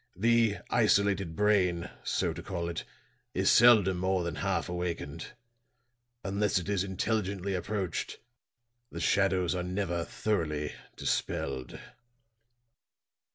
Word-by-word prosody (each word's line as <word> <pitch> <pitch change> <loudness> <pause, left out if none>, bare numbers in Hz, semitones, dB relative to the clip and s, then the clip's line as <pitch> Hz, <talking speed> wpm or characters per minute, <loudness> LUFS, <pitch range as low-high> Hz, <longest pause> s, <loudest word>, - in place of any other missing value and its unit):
The 115 +1 +3
isolated 100 -6 +2
brain, 90 -4 +2
so - - 0
to - - -7
call 85 -2 -4
it, 85 - -5 0.5
is - - +3
seldom 110 -6 +6
more 95 0 0
than 85 - -3
half 95 -4 -1
awakened. 85 -3 -4 1.0
Unless 100 0 +1
it 90 - -3
is 100 -2 +1
intelligently 100 0 -1
approached, 95 -1 -3 0.7
the - - -6
shadows 95 -3 +2
are 90 - -2
never 90 -2 -2
thoroughly 80 -8 -2 0.2
dispelled." 65 -2 -2
95 Hz, 110 wpm, -30 LUFS, 85-100 Hz, 1.0 s, seldom